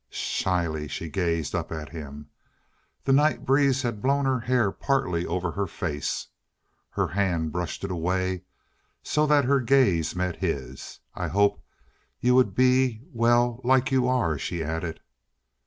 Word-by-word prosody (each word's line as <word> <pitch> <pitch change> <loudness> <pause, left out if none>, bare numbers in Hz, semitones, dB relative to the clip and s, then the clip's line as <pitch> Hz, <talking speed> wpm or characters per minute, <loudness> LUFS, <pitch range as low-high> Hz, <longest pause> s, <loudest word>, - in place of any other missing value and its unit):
Shyly 85 -5 -1
she 80 +3 -5
gazed 85 -1 -1
up - - -3
at 80 -1 -5
him. 75 -2 -9 0.7
The 135 - +2
night 150 +3 +3
breeze 135 -1 +3
had 115 -4 -3
blown 140 +1 +2
her 130 -1 +1
hair 120 -4 +1
partly 90 -13 -1
over 90 -1 -2
her 100 +2 -2
face. 75 -4 -3 0.6
Her - - -1
hand 85 -5 0
brushed 90 +3 -4
it 100 - -3
away 90 +1 -1 0.6
so 150 0 +1
that 145 -2 +4
her 140 +2 +3
gaze 115 - +2
met 90 -1 -2
his. 65 -8 -4
"I 90 - -3
hoped 100 +5 +1 0.6
you 125 +1 +3
would 125 -7 +3
be, 130 -2 +3
well, 120 +1 +2
like 130 +1 +3
you 130 -2 +2
are," 120 - +1
she 85 -2 -3
added. 80 +1 -4
95 Hz, 150 wpm, -26 LUFS, 85-130 Hz, 0.7 s, that